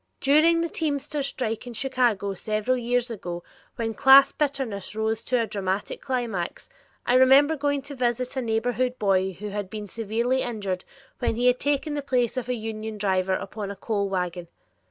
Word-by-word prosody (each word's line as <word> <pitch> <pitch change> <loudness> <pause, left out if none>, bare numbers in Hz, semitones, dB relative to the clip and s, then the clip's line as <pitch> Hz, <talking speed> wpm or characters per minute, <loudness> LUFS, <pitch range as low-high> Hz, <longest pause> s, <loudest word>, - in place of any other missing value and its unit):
During 315 +4 +4
the 335 - 0
teamsters' 290 -3 -2
strike 225 -3 -3
in 240 - -6
Chicago 235 -6 0
several 215 +5 -1
years 245 0 0
ago 175 -5 -5 0.3
when 225 -1 -2
class 275 +2 +7
bitterness 265 -10 -2
rose 220 +1 -1
to 250 - +1
a 230 - +1
dramatic 200 -1 -3
climax, 235 - -3 0.4
I 245 - +2
remember 270 +4 +6
going 285 -1 -1
to 285 +1 -7
visit 250 0 -1
a 260 - 0
neighborhood 245 +2 0
boy 190 -2 +1
who 210 +4 -7
had 205 -1 -4
been 210 +1 -6
severely 230 +5 -1
injured 200 -7 -3 0.3
when 240 -3 0
he 240 +2 0
had 250 0 +4
taken 290 +1 0
the 290 - -2
place 250 -4 0
of 250 -1 -3
a 250 - +1
union 220 -1 -5
driver 190 -2 +1
upon 205 +1 -5
a 200 - -5
coal 200 0 -2
wagon. 180 -2 -3
235 Hz, 175 wpm, -25 LUFS, 205-265 Hz, 0.4 s, class